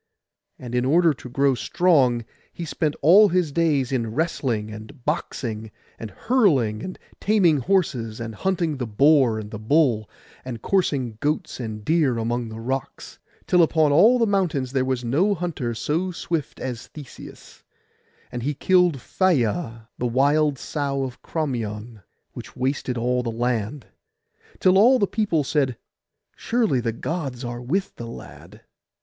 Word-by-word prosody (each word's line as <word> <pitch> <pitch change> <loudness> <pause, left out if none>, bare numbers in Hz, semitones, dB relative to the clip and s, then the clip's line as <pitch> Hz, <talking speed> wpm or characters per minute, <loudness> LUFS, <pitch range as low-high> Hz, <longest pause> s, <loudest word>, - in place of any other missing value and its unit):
And 125 -2 -9
in 125 0 +1
order 165 +4 +4
to 125 -1 -11
grow 135 +2 +2
strong 130 -3 +2 0.3
he 170 - -6
spent 155 -1 -1
all 200 +7 +7
his 175 -4 +1
days 145 -5 +1
in 115 -4 -2
wrestling, 125 -9 -1
and 110 +5 -11
boxing, 115 -8 -3 0.3
and 110 - -6
hurling, 140 - +1
and 185 - -6 0.2
taming 195 -7 +3
horses, 130 - 0
and 115 -1 -5
hunting 170 - -1
the 125 -2 -3
boar 130 +1 +4
and 105 -1 -7
the 105 - -6
bull, 115 -3 +2 0.3
and 125 -3 -6
coursing 135 - 0
goats 155 +3 -2
and 110 -3 -6
deer 155 -7 +2
among 120 +1 -2
the 110 0 -8
rocks; 130 +3 -5 0.3
till 180 - +4
upon 160 -2 +3
all 210 - +6
the 235 - +3
mountains 175 - 0
there 130 -1 +1
was 130 -1 -1
no 175 - +2
hunter 155 -9 -3
so 160 +10 -1
swift 165 -4 -4
as 125 -3 -5
Theseus; 145 -4 -12 0.7
and 120 -1 -4
he 145 +4 -2
killed 180 -1 +3
Phaia 120 - 0
the 125 - 0
wild 140 +4 +2
sow 140 0 -2
of 130 -2 -6
Crommyon, 115 -7 -4 0.3
which - - -10
wasted 130 -1 -2
all 125 +2 0
the 120 - -3
land; 120 +2 -2 0.7
till 185 +1 +4
all 250 +5 +6
the 205 - +2
people 200 -7 0
said, 135 -4 0 0.6
'Surely 225 - 0
the 115 -1 -1
Gods 135 -1 -4
are 120 0 -5
with 180 +11 -2
the 120 - -7
lad. 115 - -11
135 Hz, 155 wpm, -23 LUFS, 120-165 Hz, 0.7 s, all